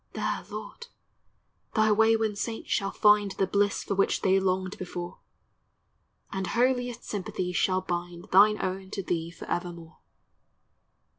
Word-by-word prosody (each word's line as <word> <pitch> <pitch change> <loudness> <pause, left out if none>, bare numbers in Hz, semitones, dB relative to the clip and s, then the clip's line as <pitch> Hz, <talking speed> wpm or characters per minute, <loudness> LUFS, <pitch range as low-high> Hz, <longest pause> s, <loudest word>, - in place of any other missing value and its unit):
There, - - -2
Lord, 475 - -8 0.9
thy 215 -1 +4
wayworn 220 0 +3
saints 225 +2 -4
shall 195 - +1
find 210 -1 +4
The 195 - +1
bliss 200 +1 +1
for - - -2
which 195 0 +1
they 190 0 +4
longed 185 0 -1
before; 175 -1 -6 1.1
And 190 -1 -3
holiest 245 0 0
sympathies 185 -2 -4
shall 185 0 +2
bind 175 -1 -4
Thine 210 +3 +6
own 190 0 -3
to 195 - -2
thee 165 -2 -2
forevermore. 170 -1 -6
195 Hz, 130 wpm, -28 LUFS, 180-210 Hz, 1.1 s, Thine